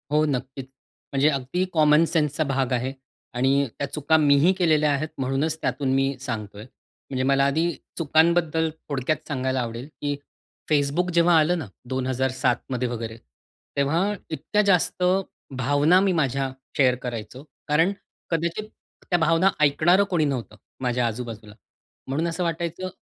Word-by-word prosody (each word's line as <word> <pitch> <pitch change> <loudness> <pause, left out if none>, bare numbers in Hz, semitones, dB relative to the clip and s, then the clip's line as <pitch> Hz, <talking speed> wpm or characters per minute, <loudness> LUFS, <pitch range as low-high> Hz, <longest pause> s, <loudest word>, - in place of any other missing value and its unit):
हो 150 +1 +3
नक्कीच. 135 -1 -3 0.5
म्हणजे 140 +2 +4
अगदी 140 +5 -1
कॉमन 155 -1 +5
सेन्सचा 155 -2 0
भाग 135 -1 0
आहे 125 +2 -1 0.4
आणि 135 +3 +2
त्या 140 - -2
चुका 150 +2 +1
मीही 145 +3 +5
केलेल्या 155 -5 +2
आहेत, 145 +2 -1
म्हणूनच 135 +4 -1
त्यातून 135 -2 -1
मी 135 +1 +1
सांगतोय. 105 -5 -5 0.5
म्हणजे 130 -1 -1
मला 135 +1 +3
आधी 160 +5 +1 0.3
चुकांबद्दल 160 0 +2 0.2
थोडक्यात 145 +2 -2
सांगायला 130 -2 -1
आवडेल, 120 +2 -5
की 145 0 -1 0.6
Facebook 150 +5 +2
जेव्हा 170 0 +4
आलं 165 +3 +2
ना, 155 - -5 0.2
2007मध्ये 130 -1 -1
वगैरे 115 -1 -5 0.6
तेव्हा 165 +9 +1 0.2
इतक्या 160 +7 0
जास्त 180 -1 +2 0.5
भावना 145 +7 +4
मी 195 -1 +2
माझ्या 135 -4 0 0.3
शेअर 130 -3 +4
करायचो. 120 +2 -6 0.2
कारण 160 +5 +3 0.4
कदाचित 170 +6 -2 0.4
त्या 175 - +2
भावना 165 +3 +4
ऐकणारं 160 +6 +4
कोणी 170 -4 +2
नव्हतं, 130 -6 -3 0.3
माझ्या 125 -1 +1
आजूबाजूला. 115 -2 -6 0.5
म्हणून 150 +6 -1
असं 170 +2 -2
वाटायचं 170 +2 -3
145 Hz, 135 wpm, -24 LUFS, 130-165 Hz, 0.6 s, कॉमन